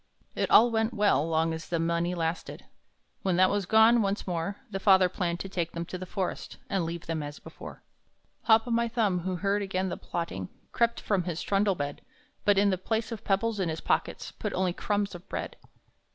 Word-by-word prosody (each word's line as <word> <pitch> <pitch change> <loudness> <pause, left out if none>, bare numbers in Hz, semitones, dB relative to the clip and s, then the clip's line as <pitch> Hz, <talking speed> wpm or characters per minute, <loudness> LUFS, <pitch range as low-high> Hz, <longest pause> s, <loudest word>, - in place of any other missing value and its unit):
It - - -1
all 235 +2 +7
went 225 +1 0
well 200 -7 +3
long 160 0 +1
as 160 0 -7
the 170 - 0
money 170 +2 0
lasted. 165 0 -3 0.6
When 185 -2 +1
that 185 +1 +5
was 200 -3 -1
gone, 220 +3 +6
once 200 0 -1
more 180 +2 -2
The 195 - -3
father 190 -2 +6
planned 175 -2 -2
to - - -5
take 175 -3 -3
them 170 0 -4
to 185 - -6
the 185 - -7
forest, 190 -1 -4
And 190 -4 +1
leave 170 +1 -5
them 165 -2 -2
as 145 0 -6
before. - - -11 0.6
Hop 225 +1 +5
o' - - -3
my 235 0 +2
Thumb, 220 -6 +1
who 185 +1 -3
heard 200 +3 0
again 190 -1 -1
the - - -4
plotting, 95 - -4 0.2
Crept 235 0 +1
from 190 -5 0
his 175 -2 -3
trundle 200 -1 +2
bed, 145 -2 -4 0.4
But 205 -1 +4
in 200 0 +4
the 185 - -1
place 220 +4 -2
of 225 -1 -6
pebbles 210 +2 0
in 180 -3 0
his 160 0 -3
pockets - - -1
Put - - -5
only 185 -1 0
crumbs 205 +1 -1
of 175 +2 -11
bread. - - -4
190 Hz, 210 wpm, -28 LUFS, 170-205 Hz, 0.6 s, all